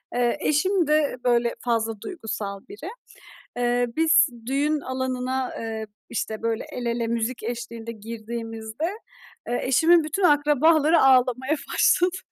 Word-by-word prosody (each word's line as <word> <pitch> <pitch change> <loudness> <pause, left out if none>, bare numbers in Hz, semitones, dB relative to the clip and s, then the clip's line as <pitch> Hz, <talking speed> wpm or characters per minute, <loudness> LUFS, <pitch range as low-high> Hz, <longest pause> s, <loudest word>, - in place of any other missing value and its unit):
Eee, 245 +3 +1
eşim 345 +3 +1
de 300 -4 +2
böyle 240 -1 +2
fazla 225 -3 -1
duygusal 220 - -5
biri. 305 - -8 0.7
Eee, 245 0 +1
biz 320 -1 +5 0.2
düğün 290 +3 +1
alanına, 260 0 -3
eee, 220 -1 -4 0.2
işte, 220 0 -3
böyle, 230 -1 -1
el 245 -1 -5
ele 235 0 -1
müzik 235 +1 -2
eşliğinde 235 0 -5
girdiğimizde, 225 +3 -6 0.6
eee, 245 - -1
eşimin 320 +6 +4
bütün 310 +6 -3
akrabaları 300 +1 +4
ağlamaya 260 +2 +3 0.2
başladı. 360 +1 +3
250 Hz, 120 wpm, -24 LUFS, 230-300 Hz, 0.7 s, biz